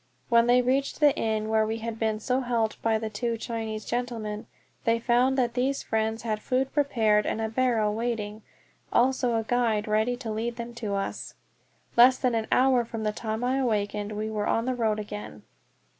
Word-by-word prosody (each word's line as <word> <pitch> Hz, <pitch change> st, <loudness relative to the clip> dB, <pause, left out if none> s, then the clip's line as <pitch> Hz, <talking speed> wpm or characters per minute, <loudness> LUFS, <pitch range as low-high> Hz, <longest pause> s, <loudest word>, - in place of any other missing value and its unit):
When 235 Hz, -1 st, +5 dB
they 250 Hz, +1 st, +5 dB
reached 270 Hz, +3 st, 0 dB
the 295 Hz, -2 st, +5 dB
inn 220 Hz, -1 st, -1 dB
where 220 Hz, 0 st, +2 dB
we 220 Hz, +1 st, -2 dB
had 225 Hz, 0 st, -5 dB
been 220 Hz, -1 st, 0 dB
so 250 Hz, +4 st, 0 dB
helped 235 Hz, -4 st, -1 dB
by 225 Hz, -1 st, +2 dB
the 220 Hz, 0 st, -3 dB
two 230 Hz, +2 st, -2 dB
Chinese 220 Hz, -1 st, -4 dB
gentlemen, 230 Hz, -3 st, -3 dB, 0.4 s
they 230 Hz, 0 st, +2 dB
found 245 Hz, +3 st, +2 dB
that 240 Hz, -2 st, +1 dB
these 265 Hz, +3 st, 0 dB
friends 220 Hz, 0 st, -1 dB
had 215 Hz, -2 st, -2 dB
food 260 Hz, +3 st, -1 dB
prepared 225 Hz, -8 st, +2 dB
and -, -, -1 dB
a 220 Hz, -, 0 dB
barrow 225 Hz, -2 st, +1 dB
waiting, 215 Hz, -1 st, -3 dB, 0.5 s
also 250 Hz, -1 st, +2 dB
a 225 Hz, -, 0 dB
guide 225 Hz, -3 st, 0 dB
ready 220 Hz, +3 st, +1 dB
to 240 Hz, -3 st, -5 dB
lead 230 Hz, +2 st, -2 dB
them 235 Hz, 0 st, -6 dB
to 215 Hz, -4 st, -3 dB
us! 195 Hz, -, -4 dB, 0.6 s
Less 250 Hz, +2 st, +7 dB
than 255 Hz, -2 st, 0 dB
an 225 Hz, -1 st, -1 dB
hour 255 Hz, -1 st, +4 dB
from 225 Hz, -1 st, -6 dB
the 215 Hz, -, +1 dB
time 220 Hz, +2 st, -4 dB
I 255 Hz, +2 st, +1 dB
awakened 210 Hz, -4 st, -1 dB
we 215 Hz, +1 st, -3 dB
were 210 Hz, -1 st, -2 dB
on 230 Hz, -, +1 dB
the 255 Hz, -, 0 dB
road 225 Hz, -3 st, 0 dB
again. 210 Hz, -, -7 dB
230 Hz, 195 wpm, -27 LUFS, 215-245 Hz, 0.6 s, Less